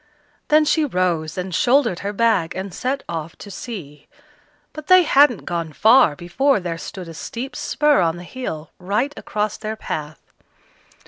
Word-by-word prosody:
Then 305 0 +4
she 310 +1 +2
rose 180 - -1
and 185 0 -4
shouldered 245 -3 +2
her 200 - -3
bag, 210 -6 +1
and 190 0 -5
set 270 +2 -2
off 165 -1 -5
to 200 - -11
see; 170 - -8 0.7
but 305 -1 -9
they 370 -1 +7
hadn't 280 - +4
gone 170 -2 -3
far, 220 - +5
before 230 - +1
there 170 -2 -4
stood 185 0 -8
a 165 - -8
steep 240 - -6
spur 295 -8 +2
of 165 -1 +1
the 175 - -9
hill, 165 - -6
right 210 +10 -1
across 210 0 -3
their 215 0 -4
path. 155 -7 -7
200 Hz, 165 wpm, -21 LUFS, 170-260 Hz, 0.7 s, they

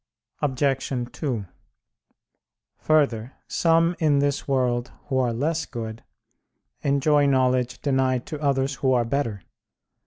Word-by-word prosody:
Obj. 135 -3 -1
2: 125 -10 -3 1.3
Further, 135 -6 +1
some 165 +1 +2
in 150 -3 +3
this 140 0 0
world 125 -3 0 0.2
who 130 - +1
are 125 -2 +1
less 150 +6 -1
good 110 -2 -6 0.8
enjoy 145 +1 +3
knowledge 130 -2 +1
denied 130 -3 +1
to 150 -1 -6
others 140 -1 +1
who 130 -1 +3
are 120 -2 +2
better. 115 -5 -2
135 Hz, 115 wpm, -24 LUFS, 125-145 Hz, 1.3 s, in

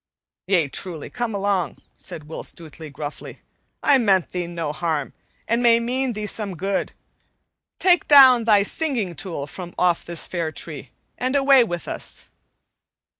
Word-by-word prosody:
"Yea, 180 -6 +2
truly, 160 +2 -6
come 240 -3 -3
along," 195 -5 -1 0.2
said 155 - -8
Will 150 +2 -7
Stutely 160 -1 -10
gruffly. 145 +1 -8 0.4
"I 275 -2 +5
meant 195 -6 +2
thee 180 -1 -3
no 170 -3 -4
harm, 155 -3 -2 0.3
and 230 +2 +1
may 235 -1 +5
mean 250 +2 -1
thee 210 0 -4
some 205 -2 -4
good. 195 +4 -2 0.9
Take 355 -3 +3
down 260 -5 +8
thy 210 -3 +5
singing 235 - -1
tool 165 -4 -5
from 175 +4 -9
off 175 -2 +2
this 170 -1 0
fair 170 -3 -3
tree, - - -7 0.3
and 255 +2 -1
away 275 -2 +6
with 175 -7 -5
us." - - -5
195 Hz, 150 wpm, -22 LUFS, 170-240 Hz, 0.9 s, down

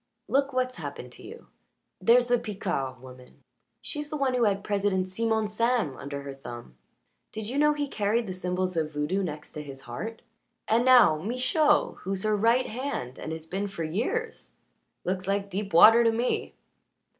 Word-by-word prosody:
Look 275 +1 +1
what's 255 -1 -1
happened - - -7
to - - -12
you. - - -11 0.5
There's 245 +1 +5
the 245 0 +2
Picard 140 - -3
woman 125 -1 -14 0.4
she's 295 -1 -4
the 305 - -3
one 270 -2 +1
who 245 -2 +2
had 200 -1 +1
President 200 -3 0
Simon 220 +2 0
Sam 225 - 0
under 140 0 -6
her 140 -1 -6
thumb. 120 - -10 0.6
Did 215 -1 -5
you 265 +5 -2
know 300 0 +5
he 295 -1 -2
carried 220 -1 0
the 185 - -5
symbols 185 0 -2
of 155 -2 -1
voodoo 150 +7 -1
next 150 -5 -6
his 140 -3 -8
heart? 220 - -7 0.4
And 230 +3 +3
now 245 -12 +7
Michaud, 290 - +1
who's 190 0 -3
her 215 0 +2
right 230 +5 +3
hand 230 - -4
and - - -5
has 160 0 -6
been 195 +5 -3
for 195 -4 -5
years. 245 - -3 0.5
Looks 185 +1 -2
like 200 0 -1
deep 195 +2 -3
water 220 +8 +8
to 230 - +4
me." 235 +2 -1
205 Hz, 175 wpm, -27 LUFS, 165-245 Hz, 0.6 s, water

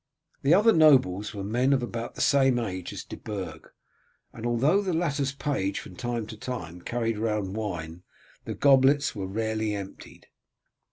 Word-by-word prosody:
The 145 +5 +5
other 215 +3 +5
nobles 130 - +4
were 100 - -4
men 125 +7 +1
of 130 -3 +1
about 120 0 -5
the - - -4
same 135 -3 +4
age 95 -6 -4
as - - -6
De - - -9
Burg, 100 -4 -7 0.6
and 115 +1 -5
although 135 - +3
the 190 -3 -2
latter's 145 -5 0
page 135 -9 -2
from - - -11
time 120 -2 -3
to 110 - -9
time 105 -8 -6
carried 115 -1 -2
round 105 -3 -1
wine 85 -6 -5 0.4
the - - -4
goblets 140 +1 +4
were 95 -2 -4
rarely 110 +1 -2
emptied. 100 -1 -9
115 Hz, 165 wpm, -27 LUFS, 100-135 Hz, 0.6 s, The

